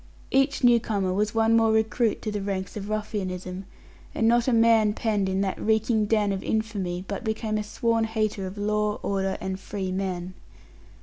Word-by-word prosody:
Each 270 +1 +2
new 240 -1 +6
comer 200 -5 -1
was 210 +3 0
one 225 0 +4
more 225 -1 +4
recruit 220 +1 +1
to 215 - -2
the 205 -1 -3
ranks 195 -1 -3
of 205 -1 -5
ruffianism, 190 -3 -4 0.5
and 225 - +2
not 235 +1 +3
a - - +3
man 225 -2 +4
penned 210 -3 0
in 190 +1 0
that 195 -1 -2
reeking 220 0 +2
den 210 -2 +2
of 195 -1 -2
infamy 195 -5 -2
but 200 +3 -4
became 220 -1 -1
a - - -2
sworn 230 +1 0
hater 215 -3 -1
of 190 +2 -9
law, 210 0 0
order, 195 -1 -1
and 190 0 -4
"free 195 -1 -4
men." 185 -1 -3
210 Hz, 185 wpm, -26 LUFS, 195-225 Hz, 0.5 s, new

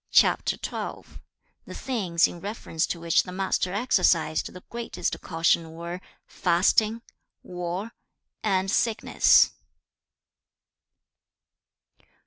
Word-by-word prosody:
The - - -2 0.6
things 190 -10 +1
in 175 - -9
reference 195 -5 -3
to 170 - -4
which 165 -1 +3
the 180 - -9
Master 185 -1 -1
exercised 170 -7 +1
the 180 - -12
greatest 235 0 -4
caution 165 -1 +1
were 170 +2 -6 0.2
fasting, 210 +6 +2 0.4
war, 180 +4 -5 0.5
and 195 -2 0
sickness. 225 0 +4
180 Hz, 85 wpm, -26 LUFS, 170-210 Hz, 0.6 s, sickness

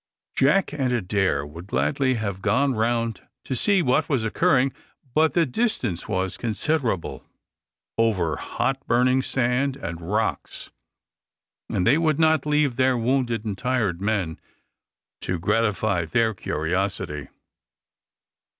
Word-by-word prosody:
Jack 150 +6 +3
and 135 -4 0
Adair 95 - 0
would 85 +5 -10
gladly 95 - +1
have 100 -4 -3
gone 125 +7 +2
round 115 -1 0 0.2
to 130 - -2
see 190 - +2
what 130 +3 +1
was 135 -7 +1
occurring, 135 +1 +2 0.4
but 155 +2 +3
the 170 -1 +4
distance 125 - -1
was 95 -1 -2
considerable, 115 - -1 0.8
over 95 -9 +2
hot 135 - -2
burning 125 +2 +3
sand 130 +1 0
and 85 -11 -6
rocks, 95 +6 -3 1.0
and 90 - 0
they 140 - +4
would 155 -3 +2
not 160 -2 +3
leave 150 -4 +2
their 130 -1 +3
wounded 120 -2 0
and 100 -3 -4
tired 115 -9 0
men 100 -6 -1 0.8
to 90 - -2
gratify 105 0 +1
their 110 +6 +1
curiosity. 90 -4 -2
115 Hz, 125 wpm, -24 LUFS, 95-135 Hz, 1.0 s, the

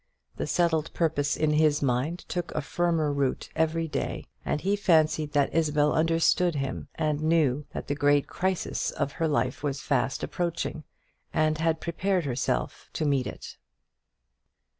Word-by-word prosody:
The - - -2
settled 165 -2 +1
purpose 150 -4 +1
in 155 -1 +2
his 150 -1 +3
mind 135 +7 -1
took 175 -1 -3
a - - 0
firmer 165 -2 0
root 140 -2 -1
every 160 +1 +1
day; 150 - -3 0.2
and - - -1
he 195 +5 +1
fancied 155 -6 +2
that 145 -1 +2
Isabel 150 -2 +2
understood 165 +1 +2
him, 135 -2 -3
and 150 -1 0
knew 150 -3 +2
that - - -5
the 145 - -1
great 145 0 +3
crisis 190 -1 -1
of 140 -1 -2
her 165 - +3
life 125 -4 0
was 140 -1 -2
fast 135 -1 0
approaching, 170 -3 -3 0.5
and 155 0 +1
had 165 0 +1
prepared 180 +1 0
herself 125 -2 -2
to 155 - -1
meet 140 -3 +1
it. - - -8
155 Hz, 155 wpm, -27 LUFS, 145-165 Hz, 0.5 s, his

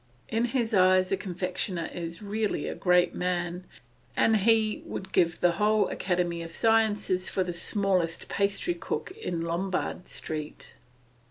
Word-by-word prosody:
In 225 +2 +1
his 235 -2 -1
eyes 185 -1 +4
a - - +4
confectioner 180 -2 -3
is 170 +2 -6
a - - -8
really 210 +1 -1
great 180 -1 +3
man, 180 0 -2 0.5
and 225 - +4
he 220 +1 +2
would 190 0 -6
give 170 -2 +2
the 175 - +5
whole 210 +4 +2
academy 175 -2 -1
of 165 - -6
sciences 210 -3 +2
for 190 - 0
the 180 -1 -4
smallest 180 -2 0
pastrycook 200 - -1
in 175 - -4
Lombard 180 +2 -2
Street. 155 -1 -5
185 Hz, 140 wpm, -28 LUFS, 175-210 Hz, 0.5 s, the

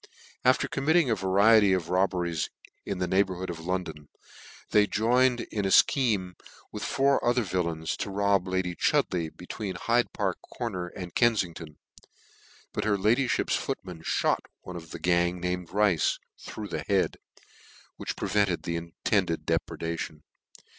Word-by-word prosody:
After - - +3
committing 150 0 +2
a - - +3
variety 100 +2 +5
of 90 -3 -1
robberies 90 -4 0 0.4
in 100 - -2
the 90 - 0
neighbourhood 95 -1 0
of 85 - -7
London, 85 -5 -4 0.6
they 105 -1 +5
joined 120 +3 +2
in 105 - -1
a - - +1
fchenie 100 -4 +3 0.4
with - - -6
four 140 0 +2
other 120 0 +2
villains 85 -4 -2
to - - -3
rob 100 -1 +1
lady 95 -1 -1
Chud - - +2
leigh, 85 -3 -1
between 95 +3 -6
Hyde 120 +6 +1
Park - - -2
Corner 95 -7 -5
and 90 0 -8
Kenfing 110 -8 +2
ton: 80 -2 -10 1.0
but - - -2
her 105 -2 +2
ladyfhip's 115 +6 +2
footman 90 -3 -4
fliot - - +1 0.2
one 90 - -9
of 80 -2 -8
the 85 - -6
gang, 85 +1 +1
named 90 -1 -3
Rice, 100 -4 +2 0.2
through 105 -2 -7
the - - -3
head, 100 -2 0 0.8
which - - -4
pre - - -3
vented 100 -4 +1
the 85 0 -2
intended 85 +1 -1
depredation. 80 -2 -3
95 Hz, 150 wpm, -28 LUFS, 85-105 Hz, 1.0 s, variety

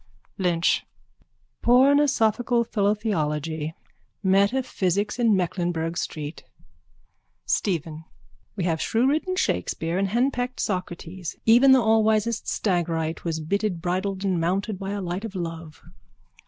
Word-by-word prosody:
LYNCH: 175 -3 +2 0.8
Pornosophical 245 -3 +3
philotheology. 160 -8 -1 0.5
Metaphysics 200 0 +1
in 230 -3 +4
Mecklenburgh 175 -2 -1
street! 150 -2 -5 1.0
STEPHEN: 160 -4 -2 0.5
We 195 - -2
have 165 -2 0
shrewridden 290 +10 +1
Shakespeare 165 - -1
and 195 - +1
henpecked 245 +3 -1
Socrates. 180 -2 -4
Even 245 +4 +6
the 260 -2 +6
allwisest 220 0 +2
Stagyrite 165 -4 -1
was 165 -2 -2
bitted, 200 +2 -1
bridled 190 +3 -2
and 185 -4 +1
mounted 190 +4 -1
by 195 -1 -5
a 200 0 -3
light 180 +2 -4
of 220 -3 -6
love. 165 -3 -6
195 Hz, 105 wpm, -25 LUFS, 170-225 Hz, 1.0 s, Even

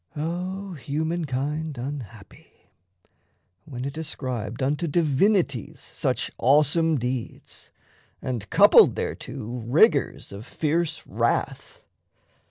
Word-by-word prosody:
O 180 +5 -4
humankind 150 -1 -2
unhappy! 120 -5 -9 0.9
when 125 -2 -6
it 140 +3 -5
ascribed 125 -7 -4
Unto 150 +5 0
divinities 155 - +1
such - - -2
awesome 150 +4 +4
deeds, 125 -1 -5 0.5
And 115 -6 -4
coupled - - +7
thereto 125 -2 -5
rigours 145 - +3
of 100 +4 -9
fierce 160 +1 -1
wrath! - - -2
145 Hz, 85 wpm, -25 LUFS, 125-160 Hz, 0.9 s, coupled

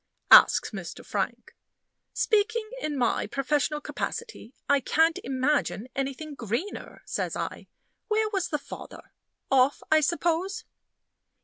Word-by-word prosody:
asks - - +8
Mr. - - -7
Frank. - - -3 0.6
"Speaking 435 +1 +1
in 295 -2 -2
my 240 -4 +1
professional 290 +4 0
capacity, 435 - -5 0.2
I 285 0 +4
can't 320 +4 +2
imagine 260 -2 0
anything 275 +3 -3
greener," 240 - -5
says - - -3
I. - - -5 0.4
"Where 435 0 +2
was 385 -4 -1
the 300 - -1
father? 285 0 -11 0.4
Off, 265 +1 +3
I 315 - +7
suppose?" 340 +4 0
300 Hz, 115 wpm, -27 LUFS, 270-380 Hz, 0.6 s, asks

